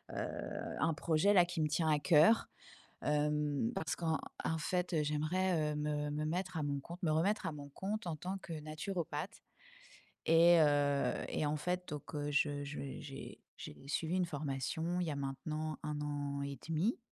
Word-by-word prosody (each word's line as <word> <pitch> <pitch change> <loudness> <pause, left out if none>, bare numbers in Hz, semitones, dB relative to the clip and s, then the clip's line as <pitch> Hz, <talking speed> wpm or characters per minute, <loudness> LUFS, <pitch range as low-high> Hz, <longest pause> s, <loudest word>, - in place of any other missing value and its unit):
heu, - - -4
un 165 - +2
projet, 165 +5 +3
là, 180 -3 +8
qui 175 0 -4
me 155 - +3
tient 160 +1 +1
à 150 -1 +4
cœur, 165 +8 +5 0.6
hem, 150 -3 +1
parce 160 - -1
qu'en 160 -2 0 0.3
en 160 - 0
fait, 180 +3 -1
heu, 155 -3 +2
j'aimerais, 155 +1 +1
heu, - - -3
me 150 0 -1
me 150 +1 -1
mettre 180 +3 -2
à 155 - 0
mon 140 -1 -1
compte. 170 +6 -9
Me 155 - +3
remettre 185 +7 +2
à 160 - -1
mon 145 -1 -8
compte 195 +6 -4
en 160 - -2
tant 185 +5 -4
que 170 - -9
naturopathe 155 +2 -4 0.9
et 165 +1 +7
heu 145 -2 +3
et 150 - 0
en 150 +1 0
fait, 180 +3 -2
donc 150 +1 -6
heu, 145 -1 -2
je 145 0 +1
je 145 +1 -6 0.2
j'ai 135 -2 -8 0.2
j'ai 75 - -8
suivi 160 +4 -1
une 185 -1 +2
formation 155 +3 -2
il - - 0
y 155 - -1
a - - -2
maintenant 155 +3 -3
1 150 -1 -2
an 145 -1 -2
et 140 -1 -4
1/2, 165 +8 +1
155 Hz, 190 wpm, -35 LUFS, 145-170 Hz, 0.9 s, là